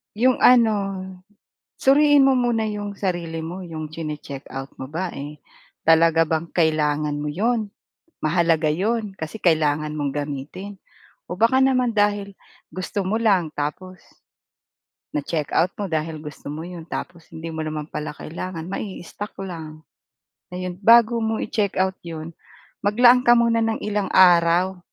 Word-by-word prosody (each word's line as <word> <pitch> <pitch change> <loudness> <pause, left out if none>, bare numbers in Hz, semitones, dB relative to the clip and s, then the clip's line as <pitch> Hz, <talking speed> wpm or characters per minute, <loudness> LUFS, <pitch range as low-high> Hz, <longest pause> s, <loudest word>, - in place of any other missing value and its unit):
'Yong 250 +4 +3
ano, 235 -4 +5 1.0
suriin 290 +1 +5
mo 270 - +5
muna 240 -3 +1
'yong 205 -1 -4
sarili 170 -4 -3
mo. 175 +3 -6
'Yong 160 -4 -7
tsini-check-out 145 -4 -7
mo 130 - -6
ba 170 +4 -3
eh, 145 +2 -7 0.5
talaga 165 0 +5
bang 160 +1 -2
kailangan 155 -3 +1
mo 150 - -3
'yon? 215 +7 0 0.5
Mahalaga 165 0 +2
'yon 205 +6 -1
kasi 160 +5 -7
kailangan 155 -3 +1
mong 145 -2 -2
gamitin 145 +8 -6 0.6
o 180 - -5
baka 260 +4 +4
naman 255 -3 +2
dahil 205 -1 +1 0.3
gusto 185 +1 -4
mo 205 - 0
lang 195 -8 +1
tapos 175 +5 -5 1.1
na-check-out 155 +4 0
mo 200 -3 -5
dahil 155 -1 -3
gusto 150 -2 -10
mo 150 +3 -5
'yon, 170 -1 -8
tapos 170 -1 -7
hindi 165 +1 -6
mo 160 -1 -4
naman 155 0 -5
pala 150 0 -5
kailangan 170 +2 -6
mai-stock 200 +1 -6
lang, 160 -4 -8 0.7
ayon. 180 0 -5
Bago 230 +3 +6
mo 220 -1 -1
i-check-out 190 -3 -1
'yon, 165 0 -7 0.5
maglaan 245 +4 +5
ka 240 - +8
muna 235 -1 +3
ng 225 -1 -1
ilang 210 -1 -1
araw, 180 0 +5
180 Hz, 135 wpm, -22 LUFS, 155-210 Hz, 1.1 s, ka